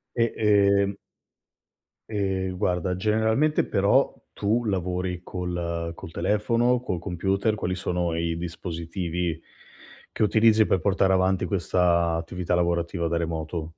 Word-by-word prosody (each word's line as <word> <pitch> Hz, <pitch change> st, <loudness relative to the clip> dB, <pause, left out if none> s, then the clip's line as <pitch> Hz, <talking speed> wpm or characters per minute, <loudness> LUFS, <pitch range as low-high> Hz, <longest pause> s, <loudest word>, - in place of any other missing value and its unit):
E 115 Hz, -, +3 dB
ehm 100 Hz, -2 st, +3 dB, 1.2 s
ehm, 95 Hz, -3 st, -2 dB
guarda, 90 Hz, -1 st, 0 dB
generalmente 110 Hz, +9 st, +2 dB
però -, -, +2 dB, 0.2 s
tu 115 Hz, +4 st, 0 dB
lavori 90 Hz, -2 st, -2 dB
col 85 Hz, -2 st, -4 dB
col 80 Hz, -, -10 dB
telefono, 115 Hz, +8 st, +1 dB
col 90 Hz, -8 st, -3 dB
computer, 95 Hz, +4 st, 0 dB
quali 90 Hz, -3 st, -2 dB
sono 90 Hz, -2 st, -2 dB
i 85 Hz, 0 st, -1 dB
dispositivi 85 Hz, 0 st, -4 dB, 0.7 s
che -, -, -3 dB
utilizzi 110 Hz, +1 st, +4 dB
per 95 Hz, -, +1 dB
portare 95 Hz, +1 st, +2 dB
avanti 95 Hz, 0 st, +2 dB
questa 85 Hz, -3 st, +1 dB
attività 90 Hz, +1 st, -3 dB
lavorativa 85 Hz, 0 st, 0 dB
da 85 Hz, -, -1 dB
remoto? 80 Hz, -1 st, -3 dB
90 Hz, 120 wpm, -25 LUFS, 85-100 Hz, 1.2 s, utilizzi